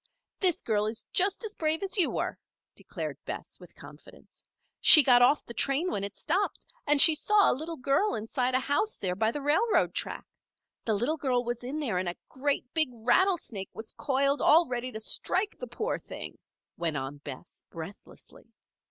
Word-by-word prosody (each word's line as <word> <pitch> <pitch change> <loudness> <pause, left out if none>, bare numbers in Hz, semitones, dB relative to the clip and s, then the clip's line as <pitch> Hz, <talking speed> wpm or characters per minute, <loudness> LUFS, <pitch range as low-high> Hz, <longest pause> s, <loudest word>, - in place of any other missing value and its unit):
"This 365 -5 +2
girl 210 -2 0
is 225 +2 -5
just 395 +4 +2
as 435 -1 -5
brave 320 0 -1
as 385 -2 -1
you 370 -6 +3
were," - - -3 0.3
declared - - -7
Bess, - - -7
with - - -16
confidence. - - -15 0.4
"She 305 - +10
got 245 -2 +5
off 255 +5 +3
the 235 - -8
train 280 +9 0
when 195 - -3
it 200 0 -6
stopped. 380 +6 -1 0.2
And 295 0 +3
she 320 - +8
saw 410 +6 +3
a - - +2
little 315 +5 -5
girl 280 +11 +1
inside 250 +4 -2
a - - +3
house 290 +12 0
there 185 -2 -2
by 220 +3 +1
the 290 +2 -6
railroad 385 +11 +2
track. - - -4 0.6
The 220 - +1
little 245 +10 -1
girl 255 -4 0
was 240 0 -4
in 270 +5 -4
there 230 -12 -1
and 180 -1 -2
a 175 - -6
great, 280 +2 -2
big 315 -4 +1
rattlesnake 240 - 0
was 220 0 -7
coiled 275 0 0
all 325 +2 +5
ready 250 0 -4
to 220 - -6
strike 380 - -1
the - - -6
poor 450 +3 -3
little - - -29
thing," - - -8 0.4
went 165 -3 -1
on 135 +1 -5
Bess, 140 +3 -11
breathlessly. 165 +4 -11
270 Hz, 190 wpm, -28 LUFS, 220-325 Hz, 0.6 s, She